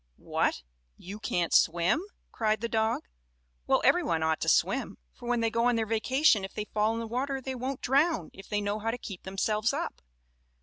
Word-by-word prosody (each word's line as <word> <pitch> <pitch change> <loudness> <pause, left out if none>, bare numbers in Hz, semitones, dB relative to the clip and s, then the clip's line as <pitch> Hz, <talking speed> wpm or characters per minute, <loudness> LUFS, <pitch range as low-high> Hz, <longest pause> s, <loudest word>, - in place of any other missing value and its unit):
"What! - - -1 0.3
You 200 +4 -9
can't 175 -5 -1
swim?" 170 - +3 0.3
cried 215 -1 0
the 235 - -1
dog. 220 0 0 0.6
"Well, - - +3
every - - +5
one 160 -1 0
ought 160 -1 +1
to - - +1
swim, - - +1 0.2
for 240 - -8
when 240 -1 +1
they 225 -1 +1
go 230 +1 +1
on 245 - +3
their 225 -1 0
vacation 225 +1 +3
if 195 - -7
they 210 - -3
fall 215 +2 0
in - - -3
the 230 - -3
water 265 +4 -2
they 265 0 -5
won't 260 +1 -4
drown 275 - +2
if 195 - -13
they 210 -1 0
know 205 +1 -2
how 225 +2 -2
to 235 - -2
keep 195 -6 -8
themselves 210 +5 0
up. 325 +4 -4
220 Hz, 210 wpm, -29 LUFS, 205-245 Hz, 0.6 s, every